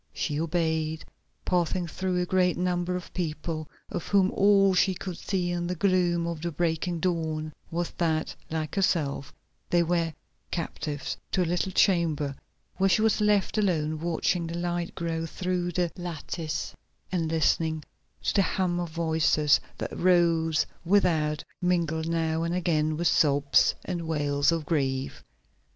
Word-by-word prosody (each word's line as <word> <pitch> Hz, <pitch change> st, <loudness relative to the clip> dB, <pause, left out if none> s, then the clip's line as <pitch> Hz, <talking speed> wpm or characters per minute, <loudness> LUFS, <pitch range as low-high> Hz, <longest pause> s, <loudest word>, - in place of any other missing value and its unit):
She 150 Hz, -2 st, -1 dB
obeyed, 160 Hz, -1 st, -1 dB, 0.4 s
passing 180 Hz, 0 st, +1 dB
through 180 Hz, +2 st, -2 dB
a 180 Hz, -, +1 dB
great 180 Hz, -1 st, +2 dB
number 180 Hz, 0 st, 0 dB
of 180 Hz, -, -7 dB
people, 155 Hz, -2 st, -3 dB, 0.2 s
of -, -, -4 dB
whom 195 Hz, -1 st, +3 dB
all 195 Hz, -1 st, +4 dB
she 185 Hz, +1 st, +3 dB
could 180 Hz, -1 st, -6 dB
see 180 Hz, -3 st, -1 dB
in 175 Hz, 0 st, -2 dB
the 180 Hz, -, -2 dB
gloom 175 Hz, -2 st, +2 dB
of 170 Hz, -2 st, -4 dB
the 170 Hz, 0 st, -2 dB
breaking 170 Hz, +2 st, -1 dB
dawn 160 Hz, -3 st, -1 dB, 0.2 s
was 170 Hz, +1 st, -2 dB
that, 160 Hz, -2 st, 0 dB
like 155 Hz, -1 st, -3 dB
herself, 155 Hz, -8 st, 0 dB, 0.4 s
they 175 Hz, -1 st, +4 dB
were 170 Hz, -1 st, 0 dB, 0.4 s
captives, 150 Hz, -4 st, -4 dB, 0.2 s
to 185 Hz, -, +3 dB
a -, -, -1 dB
little 175 Hz, +3 st, -1 dB
chamber 165 Hz, -7 st, +2 dB, 0.4 s
where 195 Hz, +1 st, +3 dB
she 205 Hz, +4 st, +3 dB
was 220 Hz, -1 st, +2 dB
left 210 Hz, 0 st, +2 dB
alone 160 Hz, -6 st, 0 dB
watching 170 Hz, +1 st, 0 dB
the 165 Hz, +1 st, -4 dB
light 175 Hz, 0 st, -2 dB
grow 165 Hz, -1 st, -2 dB
through 180 Hz, +1 st, -2 dB
the 175 Hz, -1 st, 0 dB
lattice, 165 Hz, -2 st, -4 dB, 0.4 s
and 170 Hz, -3 st, 0 dB
listening 160 Hz, -1 st, +1 dB, 0.4 s
to -, -, +1 dB
the 200 Hz, -, +4 dB
hum 180 Hz, -2 st, 0 dB
of 175 Hz, -1 st, -3 dB
voices 160 Hz, -2 st, +3 dB, 0.2 s
that -, -, -5 dB
rose 170 Hz, -3 st, +3 dB, 0.2 s
without, 165 Hz, -5 st, +2 dB, 0.2 s
mingled 165 Hz, -3 st, 0 dB
now 165 Hz, -1 st, 0 dB
and 170 Hz, +1 st, -1 dB
again 155 Hz, -3 st, +1 dB
with 170 Hz, -, -2 dB
sobs 140 Hz, -6 st, +4 dB
and 175 Hz, -3 st, -3 dB
wails 145 Hz, -2 st, +1 dB
of 165 Hz, -2 st, -1 dB
grief. 135 Hz, -4 st, -1 dB
170 Hz, 150 wpm, -27 LUFS, 160-180 Hz, 0.4 s, all